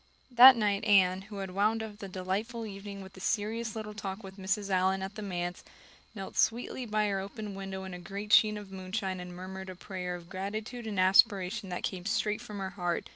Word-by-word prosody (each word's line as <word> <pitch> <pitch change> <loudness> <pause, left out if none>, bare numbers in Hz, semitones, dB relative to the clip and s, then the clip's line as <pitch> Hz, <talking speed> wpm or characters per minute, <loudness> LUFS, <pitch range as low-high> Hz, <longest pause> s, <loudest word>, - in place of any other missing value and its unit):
That 250 +2 +10
night 205 -3 +1
Anne, 190 -2 +5
who 205 - -7
had 195 -1 -4
wound 215 +4 +1
up 210 -1 -8
the 200 - -6
delightful 195 +5 -3
evening 200 -1 -7
with 190 0 -13
a - - -9
serious 220 +3 -1
little 215 -1 -5
talk 205 0 -5
with 190 0 -10
Mrs. 195 +1 -1
Allan 190 +1 +2
at 195 +1 -5
the 215 - -7
manse, 175 -3 -3 0.5
knelt 195 -2 -7
sweetly 245 +2 +1
by 215 0 +1
her 195 -1 0
open 205 +1 -6
window 195 -1 -5
in 190 -1 -7
a 180 - -6
great 200 +4 -4
sheen 215 -1 +6
of 205 -2 -9
moonshine 190 0 -3
and 180 0 -8
murmured 190 +1 -7
a 185 - -7
prayer 180 -1 -5
of 175 -1 -10
gratitude 215 +6 -5
and 205 -3 -2
aspiration 195 +1 +4
that 180 - -4
came 185 -1 -3
straight 210 0 0
from 210 -4 -8
her 190 -1 -4
heart. 175 -2 -2
195 Hz, 215 wpm, -30 LUFS, 190-215 Hz, 0.5 s, That